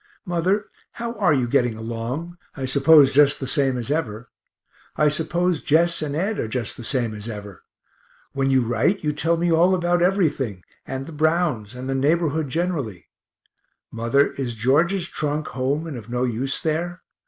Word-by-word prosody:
Mother, 185 Hz, +3 st, 0 dB, 0.3 s
how 235 Hz, 0 st, -4 dB
are 200 Hz, -7 st, +2 dB
you 130 Hz, -4 st, +2 dB
getting 120 Hz, -1 st, +1 dB
along 120 Hz, +10 st, -5 dB, 0.2 s
I 135 Hz, -, -3 dB
suppose 140 Hz, +1 st, +5 dB
just 145 Hz, 0 st, +4 dB
the 135 Hz, -, -4 dB
same 135 Hz, -1 st, +1 dB
as 120 Hz, +3 st, -3 dB
ever. 125 Hz, -7 st, -3 dB, 0.6 s
I 150 Hz, 0 st, +3 dB
suppose 165 Hz, +3 st, 0 dB
Jess 165 Hz, +2 st, +3 dB
and 145 Hz, -2 st, -3 dB
Ed 195 Hz, +7 st, -1 dB
are -, -, -1 dB
just 115 Hz, 0 st, -3 dB
the 120 Hz, -, -9 dB
same 120 Hz, -2 st, 0 dB
as 105 Hz, +2 st, -6 dB
ever. 105 Hz, -4 st, -8 dB, 0.7 s
When 135 Hz, 0 st, 0 dB
you 130 Hz, -1 st, +4 dB
write, 120 Hz, -, +1 dB
you 150 Hz, -, +1 dB
tell 165 Hz, +3 st, 0 dB
me 170 Hz, +1 st, +1 dB
all 175 Hz, +3 st, +4 dB
about 175 Hz, -1 st, +1 dB
everything, 150 Hz, -, 0 dB, 0.2 s
and 135 Hz, 0 st, -4 dB
the 165 Hz, -, -9 dB
Browns, 155 Hz, -, 0 dB
and 130 Hz, +1 st, -6 dB
the 135 Hz, -, -1 dB
neighborhood 155 Hz, +2 st, +1 dB
generally. 145 Hz, -, -3 dB, 0.8 s
Mother, 115 Hz, +5 st, +1 dB
is 125 Hz, -4 st, -4 dB
George's 165 Hz, -, +2 dB
trunk 150 Hz, -1 st, -2 dB
home 135 Hz, +5 st, -1 dB
and 160 Hz, -4 st, -6 dB
of 115 Hz, -2 st, -9 dB
no 125 Hz, +1 st, -1 dB
use 130 Hz, +2 st, -1 dB
there? 170 Hz, +2 st, -2 dB
145 Hz, 175 wpm, -23 LUFS, 125-170 Hz, 0.8 s, suppose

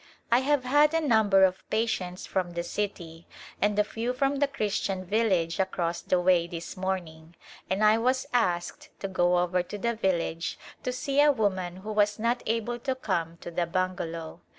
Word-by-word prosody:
I 240 Hz, -, +6 dB
have 280 Hz, 0 st, +1 dB
had 295 Hz, +4 st, +4 dB
a -, -, +4 dB
number 210 Hz, -5 st, +5 dB
of 190 Hz, 0 st, +1 dB
patients 190 Hz, -5 st, -1 dB
from 180 Hz, -2 st, -2 dB
the 170 Hz, 0 st, -2 dB
city 170 Hz, -4 st, -5 dB, 0.3 s
and 205 Hz, 0 st, +2 dB
a 210 Hz, -, +5 dB
few 230 Hz, +4 st, -3 dB
from 275 Hz, +2 st, 0 dB
the 285 Hz, 0 st, +2 dB
Christian 205 Hz, -7 st, -2 dB
village 190 Hz, -4 st, +1 dB
across 175 Hz, -3 st, -1 dB
the 185 Hz, -, +1 dB
way 175 Hz, -1 st, +3 dB
this 170 Hz, -1 st, -7 dB
morning, 175 Hz, -3 st, -4 dB, 0.3 s
and 190 Hz, +3 st, 0 dB
I 215 Hz, +1 st, +5 dB
was 255 Hz, +3 st, +1 dB
asked 175 Hz, -8 st, 0 dB
to 195 Hz, -, -2 dB
go 180 Hz, -2 st, +2 dB
over 180 Hz, +1 st, +1 dB
to 180 Hz, +4 st, -7 dB
the 235 Hz, +3 st, 0 dB
village 175 Hz, -5 st, -1 dB, 0.2 s
to 250 Hz, -, -2 dB
see 275 Hz, +3 st, +1 dB
a 295 Hz, 0 st, +6 dB
woman 190 Hz, -8 st, -1 dB
who 215 Hz, -, -3 dB
was 210 Hz, -1 st, +2 dB
not 235 Hz, +2 st, 0 dB
able 230 Hz, +2 st, -1 dB
to 260 Hz, +2 st, -2 dB
come 170 Hz, -9 st, -2 dB
to 175 Hz, -, -7 dB
the 170 Hz, 0 st, -1 dB
bungalow. 170 Hz, -, -3 dB
195 Hz, 185 wpm, -28 LUFS, 175-230 Hz, 0.3 s, I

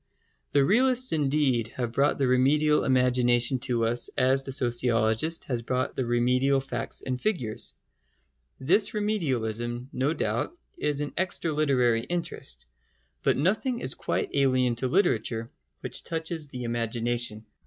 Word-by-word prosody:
The 140 Hz, -1 st, +4 dB
realists 255 Hz, -, +5 dB
indeed 140 Hz, -6 st, +1 dB
have 120 Hz, -2 st, -2 dB
brought 140 Hz, +5 st, +1 dB
the 135 Hz, -, +1 dB
remedial 145 Hz, +4 st, +3 dB
imagination 125 Hz, -1 st, +2 dB
to 120 Hz, -2 st, 0 dB
us 120 Hz, +1 st, +1 dB
as 130 Hz, +1 st, +3 dB
the 135 Hz, -, -5 dB
sociologist 120 Hz, +3 st, +1 dB
has 125 Hz, -3 st, -3 dB
brought 125 Hz, +2 st, -2 dB
the 130 Hz, -, -2 dB
remedial 125 Hz, +3 st, +2 dB
facts 135 Hz, -, -3 dB
and 130 Hz, -1 st, -3 dB
figures. 130 Hz, -, -2 dB, 0.8 s
This 195 Hz, +11 st, +2 dB
remedialism, 125 Hz, -, -2 dB
no 135 Hz, +5 st, 0 dB
doubt, 345 Hz, -, -2 dB, 0.2 s
is 145 Hz, -1 st, -1 dB
an 145 Hz, -, -4 dB
extra 175 Hz, -3 st, -1 dB
literary 125 Hz, -6 st, +2 dB
interest. 170 Hz, +7 st, -5 dB, 0.6 s
But -, -, +2 dB
nothing 215 Hz, -, 0 dB
is 130 Hz, -, -2 dB
quite -, -, -2 dB
alien 130 Hz, -3 st, +2 dB
to 130 Hz, -, 0 dB
literature 115 Hz, -, 0 dB, 0.3 s
which -, -, -4 dB
touches 160 Hz, -1 st, -5 dB
the 125 Hz, -3 st, -7 dB
imagination. 115 Hz, -1 st, -1 dB
130 Hz, 135 wpm, -27 LUFS, 120-150 Hz, 0.8 s, realists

